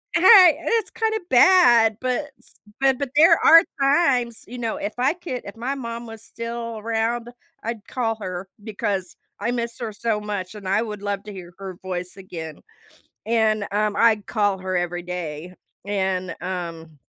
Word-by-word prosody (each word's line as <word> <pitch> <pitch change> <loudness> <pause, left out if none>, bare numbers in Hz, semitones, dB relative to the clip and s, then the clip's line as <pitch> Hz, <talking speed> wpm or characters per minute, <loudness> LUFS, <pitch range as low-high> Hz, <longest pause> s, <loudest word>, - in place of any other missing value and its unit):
a 340 - +2
Hey, 370 -4 +8
and - - -9
it's 455 -3 0
kinda 440 -1 -1
bad, 240 - +6
but 255 +3 -2
s - - -23 0.3
but 270 -1 +3
but 280 -2 -2
there 330 +2 +7
are 330 +1 +9 0.2
times, 275 -5 +2
you 250 - -8
know, 230 -2 -2
if 205 +2 -4
I 260 +4 +2
could 340 -8 -6
if 200 - -9
my 255 +4 -3
mom 235 -2 -6
was 225 -1 -10
still 230 0 -6
around, 230 +2 -2 0.3
I'd 225 -1 -5
call 230 -3 -1
her 185 0 -5 0.2
because 200 -4 -3 0.2
I 235 +4 -1
miss 235 -1 -3
her 230 -3 -4
so 215 0 -2
much 205 -2 -5
and 200 -3 -8
I 200 +3 +2
would 210 -3 -5
love 200 -1 -3
to 210 -1 -9
hear 175 -2 -10
her 195 -2 -7
voice 180 -1 -5
again. 165 -5 -9 0.6
And, 215 -2 +1
um, 210 0 0
I'd 220 -3 +3
call 205 -3 0
her 185 0 -3
every 175 0 -2
day 175 -1 -6 0.3
and, 190 -3 -2
um, 170 -4 -6
220 Hz, 180 wpm, -23 LUFS, 190-240 Hz, 0.6 s, are